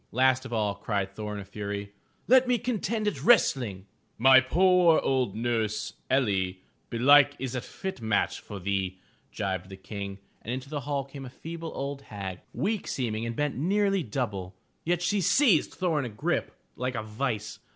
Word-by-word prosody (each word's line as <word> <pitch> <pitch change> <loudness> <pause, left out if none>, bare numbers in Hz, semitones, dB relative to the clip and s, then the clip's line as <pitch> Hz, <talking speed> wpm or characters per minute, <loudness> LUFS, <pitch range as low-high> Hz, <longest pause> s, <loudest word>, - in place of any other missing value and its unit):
Last 130 +1 +3
of - - -13
all, 105 -3 0
cried 100 -1 -2
Thor 105 -1 -5
in - - -5
a 100 - -7
fury: 100 0 -5 0.4
"Let 260 +1 +6
me 250 -1 +3
contend 225 -2 -1
at 210 - -1
wrestling." 120 - +3 0.3
"My 130 +3 +8
poor 175 +4 +4
old 130 -7 0
nurse, 110 -2 -1 0.2
Erii, 100 -8 +1 0.3
belike 145 +4 +6
is 130 -1 -4
a 125 - -2
fit 190 +1 -6
match 110 -2 0
for 100 - -8
thee," 95 0 -2 0.3
jibed 95 -3 -3
the 95 - -9
King 100 0 -6 0.2
and 115 - -5
into 130 +2 -4
the 150 - -2
hall 140 -2 0
came 135 0 -9
a 130 - -7
feeble 165 +4 -7
old 140 0 -4
hag, 95 -6 -6
weak 215 0 -2
seeming 115 -3 -2
and 115 - -4
bent 145 +1 -1
nearly 195 +5 +2
double. 105 - -3 0.3
Yet 175 +1 0
she 200 +3 +1
seized 200 - +3
Thor 175 -5 +1
in 140 - -2
a - - -4
grip 105 -1 -1 0.2
like 125 0 -2
a 110 - -2
vise. 110 0 -3
125 Hz, 180 wpm, -28 LUFS, 105-155 Hz, 0.4 s, My